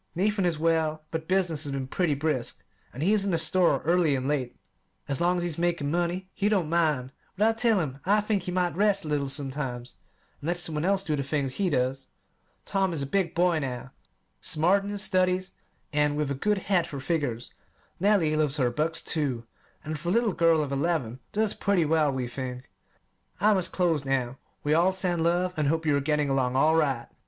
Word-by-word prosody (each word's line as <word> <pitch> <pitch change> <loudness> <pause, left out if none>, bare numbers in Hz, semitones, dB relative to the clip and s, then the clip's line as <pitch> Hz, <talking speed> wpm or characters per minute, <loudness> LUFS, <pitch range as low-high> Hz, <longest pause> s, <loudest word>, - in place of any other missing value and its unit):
Nathan 195 +1 +1
is 165 -3 0
well, 160 -1 0
but 160 0 -4
business 180 -5 +1
has 140 - -4
been 135 -1 -3
pretty 155 +3 0
brisk, 145 -4 -2 0.3
and 135 - -5
he 195 +5 +3
is 210 -2 +2
in 200 - -1
the 170 - +1
store 165 -3 +2
early 165 -3 +3
and 130 0 -2
late. 135 -4 -2 0.5
As 140 +1 -1
long 175 +1 +2
as 175 - -1
he's 170 -2 -3
making 170 -4 0
money, 175 +2 -1
he 205 0 0
don't 190 -7 +1
mind; 150 -7 +1 0.3
but 210 +3 +4
I 225 - +3
tell 225 -2 +2
him 140 -5 -3
I 205 +3 +3
think 210 -1 0
he 180 - -5
might 180 -3 0
rest 200 -1 +2
a - - -5
little 145 -2 -1
sometimes, 135 -3 -4 0.4
and 145 - -7
let 175 +1 0
some 175 -2 -1
one 150 +2 -1
else 195 0 +2
do 155 -5 -1
the 140 - -2
things 140 -1 -2
he 195 -2 +1
does. 130 -1 -1 0.6
Tom 190 -2 0
is 145 -4 -3
a - - -2
big 175 +3 -1
boy 175 -1 +3
now, 130 -2 -5 0.5
smart 180 +6 +2
in 200 - -5
his 205 0 -1
studies 185 -1 +1 0.4
and 150 0 +2
with 150 -2 -1
a - - +1
good 205 +10 0
head 190 -2 +1
for 140 - -6
figures. 130 -5 -2 0.5
Nellie 185 -5 +3
loves 150 -2 +2
her 125 -4 +1
books, 160 +6 -1
too; 135 -7 -1 0.4
and, 155 0 -4
for 170 +3 -3
a - - +1
little 225 -1 +2
girl 165 -2 +3
of 140 - -5
eleven, 140 -4 -1
does 215 0 0
pretty 190 -4 +1
well, 155 -1 +2
we 130 -2 -3
think. 125 0 -6 0.7
I 215 +1 +4
must 185 -3 -1
close 170 -5 +1
now. 135 -2 -1 0.2
We 150 - +1
all 175 +4 +3
send 180 -3 -1
love, 175 +2 +1
and 155 -2 0
hope 160 +2 0
you 150 -2 +3
are - - +2
getting 150 0 +1
along 130 -2 +1
all 155 +4 +4
right. 135 -7 +1
160 Hz, 220 wpm, -27 LUFS, 140-180 Hz, 0.7 s, but